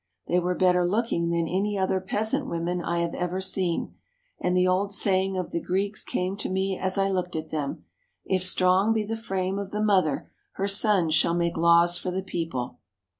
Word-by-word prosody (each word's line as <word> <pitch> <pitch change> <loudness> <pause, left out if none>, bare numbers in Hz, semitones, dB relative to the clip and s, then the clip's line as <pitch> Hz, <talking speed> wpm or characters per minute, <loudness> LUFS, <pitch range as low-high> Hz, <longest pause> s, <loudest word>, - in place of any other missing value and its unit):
They 175 - +2
were 180 0 -1
better 180 -1 +3
looking 175 -3 0
than 170 -1 0
any 200 +4 -1
other 190 0 0
peasant 220 +8 -1
women 175 -1 -2
I 170 0 -1
have 170 -1 -2
ever 180 +1 -2
seen, 190 -2 0 0.5
and 180 0 0
the 180 0 +3
old 190 +2 +1
saying 190 -1 +1
of 185 - -3
the 170 - -2
Greeks 200 +3 -1
came 185 +2 -2
to 205 - -3
me 190 +1 0
as 185 +1 -1
I 195 0 +2
looked 180 -3 -2
at 160 0 -5
them: 140 - -4 0.4
"If 190 -1 0
strong 185 +3 +3
be 220 -1 0
the 225 +2 -3
frame 195 -3 -2
of 200 -1 -5
the 210 - -4
mother, 190 -9 +1 0.2
her 195 - -2
sons 195 -5 +3
shall 165 +2 +3
make 170 -1 0
laws 170 +1 +4
for - - -4
the 185 +1 -3
people." 165 -9 -4
185 Hz, 200 wpm, -26 LUFS, 170-195 Hz, 0.5 s, laws